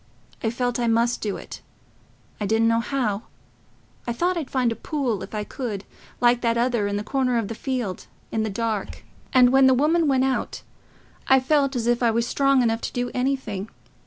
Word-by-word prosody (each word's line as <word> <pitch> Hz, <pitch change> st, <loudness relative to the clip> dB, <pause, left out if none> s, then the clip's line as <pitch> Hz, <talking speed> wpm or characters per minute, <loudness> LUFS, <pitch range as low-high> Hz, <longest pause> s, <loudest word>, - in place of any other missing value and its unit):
I 225 Hz, -, 0 dB
felt 245 Hz, +1 st, -1 dB
I 240 Hz, -, +1 dB
must 230 Hz, +1 st, +2 dB
do 205 Hz, -2 st, -2 dB
it... -, -, -10 dB, 0.8 s
I 205 Hz, -, -1 dB
didn't 225 Hz, +2 st, +3 dB
know 230 Hz, 0 st, +3 dB
how... 230 Hz, -4 st, -2 dB, 0.8 s
I 235 Hz, -, 0 dB
thought 355 Hz, +9 st, 0 dB
I'd 315 Hz, -6 st, -4 dB
find 250 Hz, -3 st, +1 dB
a -, -, -2 dB
pool, 245 Hz, -4 st, -2 dB
if -, -, -7 dB
I 210 Hz, -, -2 dB
could, 210 Hz, -4 st, -5 dB, 0.4 s
like 245 Hz, 0 st, +4 dB
that 230 Hz, -1 st, +1 dB
other, 235 Hz, -3 st, +1 dB
in 205 Hz, -, -2 dB
the 205 Hz, -, -3 dB
corner 255 Hz, 0 st, 0 dB
of 220 Hz, -3 st, -1 dB
the -, -, -3 dB
field, 240 Hz, -6 st, -4 dB, 0.2 s
in 220 Hz, -, 0 dB
the 220 Hz, -, -1 dB
dark. 215 Hz, 0 st, -3 dB, 0.3 s
And 250 Hz, -1 st, +6 dB
when 265 Hz, 0 st, +6 dB
the 260 Hz, -, +5 dB
woman 315 Hz, +4 st, +2 dB
went 265 Hz, -2 st, +3 dB
out, 265 Hz, -1 st, -2 dB, 0.6 s
I 265 Hz, 0 st, +6 dB
felt 275 Hz, 0 st, +1 dB
as 235 Hz, -2 st, -1 dB
if 240 Hz, +1 st, +2 dB
I 235 Hz, -, +4 dB
was 230 Hz, +1 st, +1 dB
strong 275 Hz, 0 st, +3 dB
enough 225 Hz, -1 st, 0 dB
to -, -, -4 dB
do 245 Hz, 0 st, -2 dB
anything... 250 Hz, -6 st, -2 dB
240 Hz, 205 wpm, -24 LUFS, 225-265 Hz, 0.8 s, And